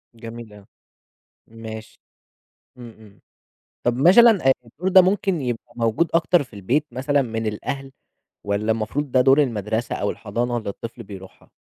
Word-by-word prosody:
جميل 115 -1 -10
أوي، 100 -1 -15 0.8
ماشي. 110 -1 -10 0.8
إمم، 120 -1 -10
إمم، 105 -2 -18 0.6
طَب 120 0 +1
مثلًا، 195 - +6
آآ، - - +8
الدور 170 +11 -4
ده 190 0 +8
ممكن 190 -3 0
يبقى 120 -2 -5
موجود 115 +8 0
أكتر 170 0 +3
في 125 - -15
البيت، 125 +10 -1
مثلًا، 140 +3 +1
من 115 -2 -4
الأهل، 135 +6 -5 0.5
والّا 100 +2 0
المفروض 115 +6 -3
ده 130 - +4
دور 135 +3 +5
المدرسة 110 -1 -2
أو 100 - -1
الحضانة 120 +3 -3
اللي 110 -3 -4
الطفل 115 +3 -7
بيروحها؟ 95 -2 -13
120 Hz, 150 wpm, -22 LUFS, 110-140 Hz, 0.8 s, آآ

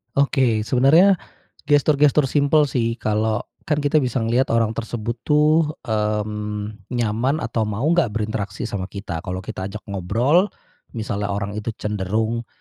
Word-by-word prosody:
Oke, 130 -6 +2
sebenernya 160 - +5 0.5
gestur-gestur 145 0 +4
simpel 150 +1 +4
sih 115 -3 0
kalau 110 -1 0 0.2
kan 150 -1 0
kita 145 +2 +3
bisa 125 -3 -1
ngeliat 120 +4 +2
orang 115 -1 +2
tersebut 115 +1 -4
tuh, 150 +1 +3
mmm, 105 -1 -3
nyaman 120 +5 0
atau 115 -1 -1
mau 105 +3 -3
gak 170 -11 +2
berinteraksi 105 -2 -3
sama 95 -2 -3
kita, 95 -5 -6
kalau 95 0 -5
kita 95 0 -5
ajak 105 +2 -8
ngobrol, 120 - +2 0.5
misalnya 105 -3 -2
orang 100 0 -3
itu 105 +1 -4
cenderung, 110 +3 -2
115 Hz, 140 wpm, -22 LUFS, 105-140 Hz, 0.5 s, sebenernya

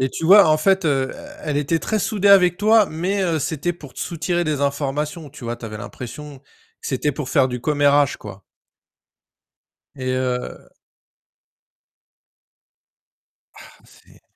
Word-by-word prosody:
Et 130 - +1
tu 160 - -6
vois, 195 +1 +8
en 155 - +4
fait, 190 +4 +2
heu 135 -3 +1
e - - -10 0.3
elle 150 -2 -2
était 155 +3 0
très 215 +5 -2
soudée 205 0 0
avec 180 -3 +6
toi, 215 0 +4
mais 185 +5 -2
heu, 170 -4 0
c'était 160 +4 -2
pour 145 -7 -13
te - - -13
soutirer 175 +1 -2
des 150 -3 -2
informations, 145 +2 -2
tu 135 -2 -12
vois? 120 0 -3
Bah - - -16
tu 115 - -6
avais 110 - -7
l'impression 140 +6 -9
que - - -29 0.5
c'était 145 +2 -1
pour 135 -1 -6
faire 135 -4 +3
du 125 -1 -5
commérage, 145 -1 +2
quoi. 100 -2 -11 1.5
Et 130 -2 -3
heu 125 -1 -4 2.8
Ah - - -14 0.2
c'est - - -22
150 Hz, 160 wpm, -21 LUFS, 135-175 Hz, 2.8 s, vois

